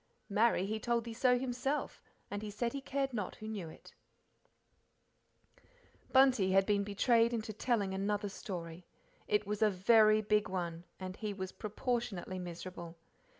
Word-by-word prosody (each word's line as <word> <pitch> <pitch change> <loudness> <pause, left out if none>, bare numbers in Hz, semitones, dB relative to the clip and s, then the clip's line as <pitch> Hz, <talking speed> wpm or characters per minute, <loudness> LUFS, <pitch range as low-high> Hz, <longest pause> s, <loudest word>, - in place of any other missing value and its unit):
'Marry, 210 -2 +3
he 215 +2 -2
told 235 +1 0
the 230 0 -6
so 250 +1 +3
himself, 260 +3 -2 0.3
and 205 0 -3
he 215 - -5
said 235 +3 -2
he 275 - -4
cared 270 -1 -2
not 210 -5 -3
who 215 - -9
knew 200 -7 -5
it'" - - -14 2.2
Bunty 260 -8 +5
had 195 0 +5
been 205 -1 +2
betrayed 230 +3 +3
into 215 -1 -4
telling 210 -3 0
another 205 +1 -1
story. 175 -3 -7 0.4
It 210 0 +2
was 210 +1 -3
a 215 - +6
very, 215 +2 +5
big 210 0 +2
one, 170 -2 -3
and 185 0 -5
he 210 -2 -4
was 190 -1 -5
proportionately 215 -4 -3
miserable. 175 -1 -7
210 Hz, 150 wpm, -34 LUFS, 190-235 Hz, 2.2 s, a